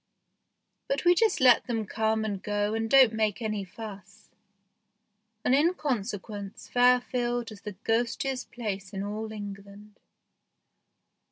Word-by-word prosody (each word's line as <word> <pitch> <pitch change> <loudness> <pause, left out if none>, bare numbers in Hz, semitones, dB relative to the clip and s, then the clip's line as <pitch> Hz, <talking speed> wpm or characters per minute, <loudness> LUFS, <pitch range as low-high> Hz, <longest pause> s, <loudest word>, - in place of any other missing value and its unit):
But 275 +4 -1
we 350 - +7
just 430 +3 +2
let 255 -2 +5
them 225 -3 -1
come 220 +1 0
and 200 -3 -3
go 205 0 -1
and 225 0 -1
don't 260 -4 +7
make 215 -1 0
any 215 -3 -2
fuss, 200 0 -11 1.1
and 250 - +3
in 320 +6 +4
consequence 205 - -4
Fairfield 245 -1 +2
is 205 -2 -11
the 210 -2 -7
ghostiest 240 +3 -1
place 200 -4 -5
in 195 0 -3
all 215 +2 -4
England. 205 0 -9
220 Hz, 125 wpm, -28 LUFS, 205-245 Hz, 1.1 s, we